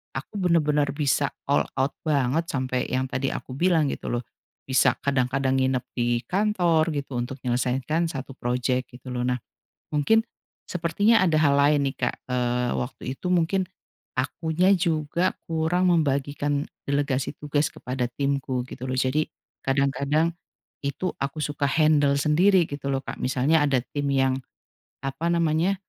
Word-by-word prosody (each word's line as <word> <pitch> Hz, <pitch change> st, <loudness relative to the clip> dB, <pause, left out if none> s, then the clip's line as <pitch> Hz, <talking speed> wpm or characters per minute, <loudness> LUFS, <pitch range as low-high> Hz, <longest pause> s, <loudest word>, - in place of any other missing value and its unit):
aku -, -, -6 dB
bener-bener 150 Hz, -5 st, +2 dB
bisa 145 Hz, -1 st, +1 dB, 0.2 s
all 140 Hz, -, +3 dB, 0.2 s
out 135 Hz, +2 st, +1 dB
banget 145 Hz, 0 st, +1 dB
sampai 130 Hz, -1 st, -1 dB
yang 130 Hz, 0 st, +1 dB
tadi 135 Hz, +1 st, -1 dB
aku 130 Hz, -, -6 dB
bilang 165 Hz, -1 st, +3 dB
gitu -, -, -5 dB
loh, 120 Hz, 0 st, -1 dB, 0.4 s
bisa 130 Hz, -1 st, +4 dB
kadang-kadang 130 Hz, 0 st, +1 dB
nginep 130 Hz, -1 st, +1 dB
di 120 Hz, -1 st, +1 dB
kantor 175 Hz, -5 st, +2 dB
gitu 140 Hz, -3 st, -4 dB
untuk 125 Hz, +3 st, -4 dB
menyelesaikan 130 Hz, +6 st, 0 dB
1 135 Hz, -1 st, -6 dB
proyek 125 Hz, +1 st, -1 dB
gitu 130 Hz, 0 st, -10 dB
loh. 125 Hz, 0 st, -1 dB
Nah 125 Hz, 0 st, 0 dB, 0.6 s
mungkin 220 Hz, +10 st, +3 dB, 0.4 s
sepertinya 185 Hz, +6 st, +2 dB
ada 165 Hz, -4 st, +3 dB
hal 145 Hz, -2 st, +4 dB
lain 145 Hz, 0 st, +4 dB
nih 135 Hz, -, -12 dB
Kak, -, -, -7 dB
eee, 125 Hz, -1 st, 0 dB
waktu 125 Hz, -, -5 dB, 0.2 s
itu -, -, -6 dB
mungkin 180 Hz, +2 st, +2 dB, 0.5 s
akunya 160 Hz, +7 st, +1 dB
juga 170 Hz, +1 st, 0 dB
kurang 170 Hz, +3 st, +1 dB
membagikan 145 Hz, -2 st, 0 dB, 0.2 s
delegasi 140 Hz, -2 st, 0 dB
tugas 150 Hz, 0 st, 0 dB
kepada 125 Hz, -3 st, -3 dB
timku 140 Hz, -1 st, -1 dB
gitu 125 Hz, -, -8 dB
loh, -, -, -2 dB
jadi 135 Hz, +4 st, +2 dB, 0.4 s
kadang-kadang 140 Hz, +4 st, +1 dB, 0.5 s
itu 140 Hz, +6 st, -2 dB
aku 140 Hz, +3 st, -3 dB
suka 145 Hz, -1 st, -1 dB
handle 145 Hz, -1 st, +3 dB
sendiri 170 Hz, +7 st, +4 dB
gitu 145 Hz, -1 st, -6 dB
loh 135 Hz, -, +1 dB
Kak, -, -, -7 dB
misalnya 135 Hz, +5 st, +2 dB
ada 135 Hz, -3 st, +2 dB, 0.2 s
tim 145 Hz, -1 st, 0 dB
yang, 135 Hz, -1 st, +2 dB, 0.6 s
apa 135 Hz, +5 st, -2 dB
namanya, 170 Hz, +3 st, +2 dB
140 Hz, 145 wpm, -25 LUFS, 130-160 Hz, 0.6 s, bisa